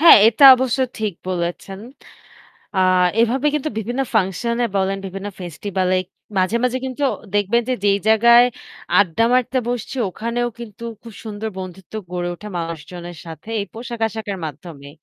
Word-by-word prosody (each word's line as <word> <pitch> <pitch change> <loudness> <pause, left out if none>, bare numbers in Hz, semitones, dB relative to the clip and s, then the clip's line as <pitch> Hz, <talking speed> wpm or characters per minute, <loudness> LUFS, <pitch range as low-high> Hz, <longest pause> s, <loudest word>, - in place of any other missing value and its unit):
হ্যাঁ, 335 - +10
এটা 235 +5 +4
অবশ্য 260 0 0 0.2
ঠিক 215 -3 -1 0.2
বলেছেন। 180 +2 -3 1.0
আ - - +2 0.4
এভাবে 255 +5 +2
কিন্তু 300 +1 -1
বিভিন্ন 240 +5 -2
ফাংশন 220 +3 +1
এ - - 0
বলেন, 195 0 0
বিভিন্ন 195 +2 -6
ফেস্টিভাল 185 +2 -3
এ - - +2 0.4
মাঝে, 185 +5 +2
মাঝে 250 +1 +1
কিন্তু 260 +2 -4 0.3
দেখবেন 205 +4 +2
যে - - +2
যেই 200 0 +4
জায়গায় 235 +2 +7 0.5
আড্ডা 195 +2 +2
মারতে 255 +1 +2
বসছি 245 +1 -3
ওখানেও 235 +5 -2
কিন্তু 235 -1 -9 0.2
খুব 230 -3 -11
সুন্দর 220 0 -5
বন্ধুত্ব 185 +1 -9 0.2
গড়ে 175 -1 -2
ওঠে 210 +4 -10
মানুষজনের 170 +1 -6
সাথে 165 +7 -10
এই 200 - -2
পোশাক-আশাখের 225 -3 -3
মাধ্যমে। 145 -1 -9
210 Hz, 150 wpm, -20 LUFS, 185-235 Hz, 1.0 s, হ্যাঁ